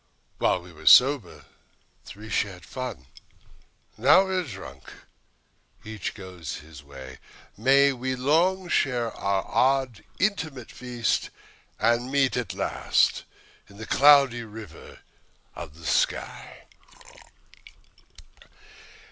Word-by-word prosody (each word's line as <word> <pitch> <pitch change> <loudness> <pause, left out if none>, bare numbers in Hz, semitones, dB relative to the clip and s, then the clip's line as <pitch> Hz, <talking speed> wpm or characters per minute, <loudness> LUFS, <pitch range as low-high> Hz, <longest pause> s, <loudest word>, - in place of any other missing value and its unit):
While 90 - +1
we 90 -1 -14
were 80 0 -12
sober, 120 - +5 0.6
three 105 +3 -11
shared 95 -3 -2
the - - -16
fun; 125 - -6 0.9
Now 145 - +6
we 190 - -4
are - - +1
drunk, 105 - -10 0.9
each 110 -3 -6
goes 90 -6 -8
his 75 -1 -12
way. 65 -2 -12 0.4
May 135 +5 +4
we 130 +1 -3
long 170 +8 +1
share 120 -8 0
our 100 -2 -2
odd, 130 -4 0
inanimate 160 - -2
feast, 120 -2 -2 0.5
And 120 +3 +1
meet 140 -2 +2
at 125 -5 -3
last - - 0 0.4
on 100 - -16
the 110 - -8
Cloudy 140 -3 +5
River 110 -6 -12 0.5
of 80 -3 -9
the 80 - -13
sky. - - -2
120 Hz, 110 wpm, -25 LUFS, 95-135 Hz, 0.9 s, Now